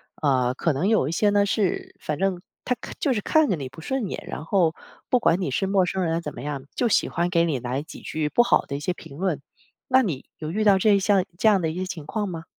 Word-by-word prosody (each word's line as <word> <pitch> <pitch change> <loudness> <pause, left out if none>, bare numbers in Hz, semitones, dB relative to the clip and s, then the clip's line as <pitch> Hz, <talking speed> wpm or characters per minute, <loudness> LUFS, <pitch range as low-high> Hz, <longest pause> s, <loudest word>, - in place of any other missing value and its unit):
啊 130 -4 +1
可 165 +5 0
能 150 +8 0
有 215 -11 +3
一 - - -2
些 205 +5 +2
呢， 205 0 +3
是 200 -2 -1
反 150 - -3
正 190 -1 0 0.2
他 250 - +1
看 - - -7
就 280 - +2
是 210 - -1
看 315 +8 +3
着 185 - +2
你 135 -4 -6
不 135 +5 -12
顺 260 -1 -2
眼， - - -6
然 150 - -5
后 170 -3 +2 0.4
不 250 - +4
管 180 -6 +3
你 160 - -1
是 195 - 0
陌 195 -1 +3
生 185 +1 -1
人 165 0 0
怎 150 -3 -6
么 - - -8
样， 140 -2 -4
就 245 - +1
喜 215 - +2
欢 175 0 -1
给 170 -2 +3
你 150 -6 -1
来 125 +3 -2
几 160 - -11
句 155 -1 -2
不 240 - +4
好 240 - +3
的 140 - -5
一 - - -3
些 175 +5 -1
评 155 -5 -12
论。 180 -5 -1 0.5
那 260 0 +5
你 165 - -3
有 155 -1 -4
遇 215 +5 0
到 200 -2 +6
这 205 +1 +5
一 200 - +3
项 195 -1 +3
这 220 - +2
样 200 -4 +5
的 160 - 0
一 160 - -5
些 185 +1 -2
情 165 -5 -6
况 210 +3 -2
吗？ 165 -3 -6
180 Hz, 300 characters per minute, -24 LUFS, 155-205 Hz, 0.5 s, 到